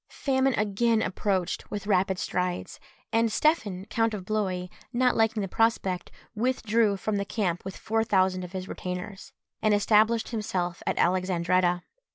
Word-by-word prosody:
Famine 265 -2 +1
again 220 +2 +1
approached 190 -1 -1
with 205 0 -5
rapid 190 -2 +2
strides, 180 -1 -2 0.3
and 225 0 +3
Stephen 210 - +1
count 225 -1 0
of 190 -3 -7
Blois, 190 -4 -1 0.3
not 250 0 +2
liking 225 -1 +2
the - - -2
prospect, 190 -4 0 0.2
withdrew 225 -3 +1
from 205 +2 -1
the 200 - 0
camp 190 -4 -2
with 190 0 -7
four 225 +1 0
thousand 190 -4 +2
of 180 +1 -9
his 185 0 -4
retainers, 180 +2 -6 0.3
and 215 -1 +4
established 220 +2 +3
himself 185 -6 -2
at - - 0
Alexandretta. 180 -1 +2
205 Hz, 150 wpm, -27 LUFS, 185-225 Hz, 0.3 s, and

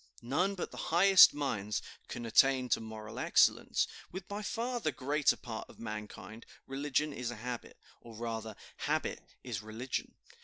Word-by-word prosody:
"None 175 +11 +1
but 180 - -4
the - - -10
highest 185 +3 +8
minds 110 -8 -2 0.3
can 120 - -6
attain 130 +2 +4
to - - +2
moral 110 -1 -7
excellence. - - +3 0.3
With 185 0 -7
by 205 +1 -4
far 240 +3 -2
the 155 - 0
greater 145 +2 +1
part 115 -3 -7
of - - -15
mankind 110 0 -7 0.2
religion 145 +2 -1
is 125 -3 -3
a 120 - -5
habit; 120 +2 -6 0.2
or 115 -1 -12
rather 110 -1 -4 0.2
habit - - -1 0.2
is - - -4
religion. 110 +4 -4
125 Hz, 155 wpm, -33 LUFS, 110-150 Hz, 0.3 s, highest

